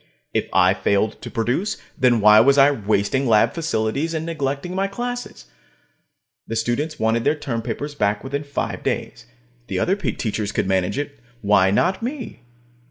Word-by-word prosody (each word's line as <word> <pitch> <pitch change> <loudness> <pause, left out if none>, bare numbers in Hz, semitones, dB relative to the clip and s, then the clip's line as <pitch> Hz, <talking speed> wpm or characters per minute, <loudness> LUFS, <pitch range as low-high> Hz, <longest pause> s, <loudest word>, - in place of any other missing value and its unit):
If - - -1
I - - +4
failed 100 +2 0
to - - -7
produce, 125 - -1 0.2
then 125 -3 +3
why 105 +1 +8
was 135 +5 +5
I 140 +1 +7
wasting 110 +2 0
lab 110 - +4
facilities 160 - -1
and 160 0 -2
neglecting 145 +1 -3
my 195 +1 0
classes? 245 +4 -5 1.0
The 115 - -4
students 120 +8 -1
wanted 110 +1 +1
their 150 - +2
term 120 -6 -3
papers 125 +6 -4
back 105 -6 0
within 140 +2 -3
five 140 -1 -4
days; - - -4 0.4
the - - -3
other 190 - +2
teachers 110 - -2
could - - -1
manage 95 +3 0
it, 145 -1 -4 0.2
why 100 -2 +4
not 185 - +1
me? 250 0 -5
135 Hz, 165 wpm, -22 LUFS, 110-155 Hz, 1.0 s, why